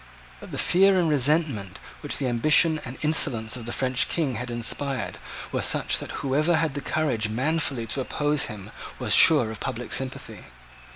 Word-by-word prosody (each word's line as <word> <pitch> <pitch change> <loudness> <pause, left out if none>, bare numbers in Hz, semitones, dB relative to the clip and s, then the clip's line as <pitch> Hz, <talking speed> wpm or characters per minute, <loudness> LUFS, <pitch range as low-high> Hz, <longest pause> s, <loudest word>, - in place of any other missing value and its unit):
But - - -12
the - - -7
fear 190 +1 +3
and 170 - +1
resentment 145 - 0 0.2
which - - -2
the 140 - -2
ambition 155 +6 +3
and 125 +1 -9
insolence 130 -8 +2
of 120 -2 -8
the - - -5
French 130 0 0
King 155 -6 -2
had 125 +2 -6
inspired 125 +3 -2 0.3
were - - -2
such - - +1
that - - -7
whoever 150 +6 +1
had 160 -3 -1
the 145 - -5
courage 130 -9 -1
manfully 135 +1 -1
to 125 +5 -2
oppose 145 +2 -1
him 105 -1 -9 0.3
was - - 0
sure 140 -9 +7
of 110 - -8
public 120 +1 -5
sympathy. 130 -1 -5
135 Hz, 175 wpm, -24 LUFS, 120-155 Hz, 0.3 s, sure